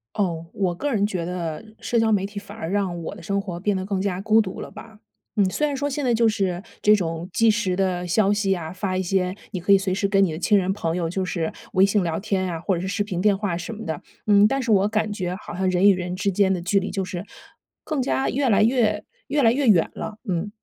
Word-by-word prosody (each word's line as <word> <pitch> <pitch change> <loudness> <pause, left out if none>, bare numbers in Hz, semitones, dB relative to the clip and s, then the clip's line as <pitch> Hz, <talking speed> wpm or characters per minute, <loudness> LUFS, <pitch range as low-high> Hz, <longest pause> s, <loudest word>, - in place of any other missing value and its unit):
哦， 170 -5 -1
我 190 -3 0
个 285 +10 -2
人 205 -2 +2
觉 185 -5 -2
得 170 -2 -4 0.2
社 235 - +1
交 225 0 +3
媒 195 -2 +2
体， 200 +1 -6
反 205 +1 -12
而 160 - -4
让 190 -3 -1
我 - - -5
的 - - -11
生 200 -1 -1
活 180 -4 -6
变 205 +2 0
得 190 0 -2
更 195 -1 -1
加 190 -2 -2
孤 220 +2 +4
独 190 -3 -5
了 - - -8
吧。 220 -2 -12 0.4
嗯， 205 - +4
虽 300 +10 0
然 285 - -2
说 285 +1 -1
现 285 0 -2
在 245 - +3
就 230 0 +4
是 190 -4 -1 0.2
这 210 0 +6
种 170 -2 -3
即 225 -1 +4
时 205 -4 0
的 180 -2 -1
消 200 +3 +3
息 205 -2 +1
啊， 160 -3 -6
发 185 +1 -3
一 185 - 0
些 185 0 0 0.2
你 185 - -3
可 200 +3 +3
以 - - +8
随 195 -1 -1
时 200 +1 0
跟 195 0 +3
你 185 - +1
的 155 - -5
亲 205 +3 +3
人 190 -1 +1
朋 165 -4 -2
友 170 -2 -1
就 185 +2 -2
是 170 -3 -2 0.2
微 190 0 +6
信 200 +1 +2
聊 165 -3 -1
天 190 -2 -1
啊， 165 -2 -4
或 190 - 0
者 - - -3
是 185 - -3
视 205 +2 0
频 190 -4 -4
电 200 +1 +3
话 195 -4 -2
什 180 +6 -6
么 220 - -8
的， 160 -2 -4 0.3
嗯， 205 0 +6
但 270 +4 0
是 230 - 0
我 200 -1 +4
感 215 0 -1
觉 185 -3 -3
好 195 - -9
像 185 +1 0
人 185 +2 +5
与 - - +7
人 180 -1 -3
之 200 +1 0
间 190 0 +2
的 180 - -2
距 190 +3 +2
离 195 - -4
就 195 0 -2
是 180 0 -5 0.6
更 305 -4 -2
加 265 +1 0
越 275 +1 0
来 215 -3 +4
越 215 -3 +2 0.2
越 285 0 +1
来 225 - +6
越 270 +2 0
远 180 -7 +5
了， 215 - -6
嗯。 180 +3 -1
195 Hz, 295 characters per minute, -23 LUFS, 180-210 Hz, 0.6 s, 以